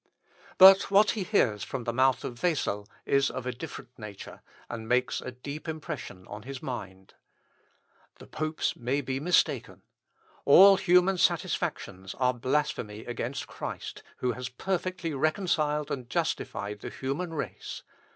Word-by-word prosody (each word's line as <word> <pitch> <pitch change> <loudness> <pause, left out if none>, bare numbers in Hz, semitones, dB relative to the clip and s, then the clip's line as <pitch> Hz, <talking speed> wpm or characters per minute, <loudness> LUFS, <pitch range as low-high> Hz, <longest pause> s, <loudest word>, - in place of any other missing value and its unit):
But 190 0 +9
what 205 +2 +5
he 215 - -3
hears 115 - +1
from 130 -3 -5
the 120 0 -2
mouth 130 +1 +3
of 120 -1 -6
Wessel 105 - 0 0.2
is 140 -1 +3
of 130 - -6
a 125 - -1
different 125 0 -9
nature, 105 -2 -9 0.3
and 115 -1 -7
makes 125 0 +1
a - - -5
deep 140 +6 -8
impression 150 - -6
on 105 +1 -8
his 135 +3 -7
mind. 95 -8 -7 1.0
"The - - -13
popes 155 0 -2
may 130 +4 -1
be 130 0 -3
mistaken. 170 +4 +1 0.6
All 195 +7 +8
human 180 0 +4
satisfactions 95 - -1
are 125 -1 +2
blasphemy 120 -4 -2
against 120 +2 -4
Christ, - - -7 0.2
who 125 - 0
has 125 +2 -5
perfectly 180 +3 -3
reconciled 150 -1 0
and 125 -3 -4
justified 105 -2 -2
the - - -6
human 160 +6 -4
race. - - -5
135 Hz, 140 wpm, -28 LUFS, 120-160 Hz, 1.0 s, But